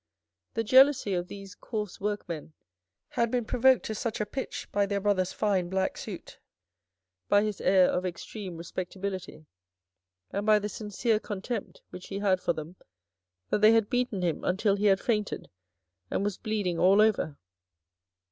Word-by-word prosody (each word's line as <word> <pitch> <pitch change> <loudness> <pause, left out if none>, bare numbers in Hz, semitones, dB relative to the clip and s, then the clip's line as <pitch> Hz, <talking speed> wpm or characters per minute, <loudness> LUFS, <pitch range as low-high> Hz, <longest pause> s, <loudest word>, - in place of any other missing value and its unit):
The 225 - 0
jealousy 260 -2 +5
of 175 -1 -1
these 195 0 -9
coarse 210 -5 -5
workmen 175 -7 -4 0.6
had 235 -1 0
been 245 -1 0
provoked 260 +3 +3
to 220 - -3
such 225 +1 -3
a 210 - 0
pitch 265 +6 -5
by 200 0 +2
their 200 0 -1
brother's 195 -2 +1
fine 190 -4 0
black 190 0 0
suit, - - -8 0.9
by 205 0 +5
his 210 -3 -3
air 185 -1 +5
of 180 - 0
extreme 185 +1 -6
respectability, 185 0 -5 0.9
and 200 - -2
by 215 0 +5
the 210 0 -2
sincere 215 +1 -1
contempt 205 +2 -5
which 180 - -9
he 195 - -5
had 195 -2 +2
for - - +1
them, 160 +3 -8 0.7
that - - +1
they 215 +1 +7
had 225 -2 +2
beaten 245 -6 0
him 170 -3 -1
until 195 +2 +2
he 205 +1 -1
had 195 -1 +4
fainted 210 -2 -2 0.6
and - - -1
was 205 -2 -1
bleeding 205 -6 -2
all 195 +3 +5
over. 210 -9 +2
200 Hz, 160 wpm, -28 LUFS, 185-215 Hz, 0.9 s, they